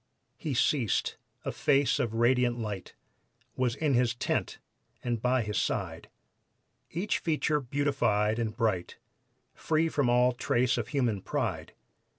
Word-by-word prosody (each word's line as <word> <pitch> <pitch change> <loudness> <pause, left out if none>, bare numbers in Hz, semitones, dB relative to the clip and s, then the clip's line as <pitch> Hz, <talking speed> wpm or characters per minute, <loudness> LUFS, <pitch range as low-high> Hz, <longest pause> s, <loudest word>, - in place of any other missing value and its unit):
He 150 -5 -3
ceased; 120 -3 +1 0.3
a - - -1
face 140 -2 +2
of 115 -2 -1
radiant 120 +1 +3
light 105 -5 -5 0.6
Was 125 -2 0
in 150 -1 +1
his 120 -1 +2
tent - - -1 0.5
and 120 -3 -1
by 125 0 +2
his 105 -2 -1
side; - - -2 0.8
Each 180 +6 -1
feature 155 -2 +1
beautified 120 -6 +1
and 110 -2 -2
bright, 105 -7 -1 0.6
Free 160 +1 +1
from 145 -5 +1
all 125 +1 +4
trace 120 0 +1
of 110 - -3
human 120 -7 0
pride. - - -3
125 Hz, 135 wpm, -29 LUFS, 115-140 Hz, 0.8 s, all